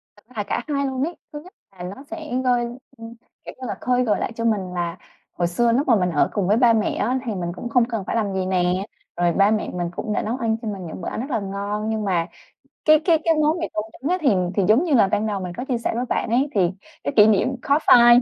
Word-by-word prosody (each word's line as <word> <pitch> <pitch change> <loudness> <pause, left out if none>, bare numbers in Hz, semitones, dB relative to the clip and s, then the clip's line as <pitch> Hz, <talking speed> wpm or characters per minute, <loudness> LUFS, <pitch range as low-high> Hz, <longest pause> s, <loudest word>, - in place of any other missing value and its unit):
Thật 205 - -22
ra 255 - -20
là 210 - 0
cả 200 - -2
hai 280 -2 0
luôn 265 0 -2
ấy. 340 +3 -3 0.2
Thứ 295 - -5
nhất 365 - -15 0.2
là 180 -2 -10
nó 270 - -12
sẽ 315 -6 -5
hơi, 245 -1 +2 0.3
ưm, 230 0 -9 0.3
kiểu - - -7
như 255 - -4
là, - - -3
khơi 250 0 +2
gợi 215 -4 +1
lại - - -2
cho 230 - -3
mình 195 -5 0
là 175 0 -3 0.4
hồi 175 -1 0
xưa 230 +7 +1
lúc 270 +5 +1
mà 235 - +5
mình 180 -3 +1
ở 150 - +2
cùng 195 -4 0
với 210 +3 +3
ba 240 -2 +5
mẹ 215 -1 +1
á, 255 +4 0
thì 220 -4 -2
mình 175 -2 -3
cũng 240 - -6
không 235 0 +3
cần 225 -4 -4
phải - - -2
làm 210 -4 0
gì 190 -1 -1
nè, 185 +1 0 0.3
rồi 175 0 +2
ba 200 +1 +4
mẹ 215 -1 0
mình 175 -1 -2
cũng 215 - -3
đã - - 0
nấu 235 +4 -2
ăn 225 -3 0
cho 225 - -6
mình 195 -4 -5
những 160 - -8
bữa - - -3
ăn - - -4
rất 270 - -6
là - - +1
ngon. 200 +2 -3
Nhưng 220 -1 -1
mà 175 -4 0 0.6
cái 310 -1 +6
cái 330 -3 +4
cái 330 -1 +4
món 310 +3 +2
mì 330 - -2
tôm 210 - -2 0.2
trứng 285 +7 -2
á, 365 - +2
thì 290 - +2 0.3
thì 200 - +2
giống 240 +11 +5
như 310 -5 +1
là 220 - +6
ban 210 +2 0
đầu 205 -2 -2
mình 180 -1 -5
có 250 - -4
chia 255 -3 -1
sẻ 235 - -2
với 245 - -1
bạn - - -1
ấy, 260 +5 +2
thì 200 - +3 0.4
cái - - -1
kỷ 210 -1 +8
niệm 220 +3 +3
khó 285 +1 +3
phai. 240 0 +8
220 Hz, 295 wpm, -22 LUFS, 195-255 Hz, 0.6 s, kỷ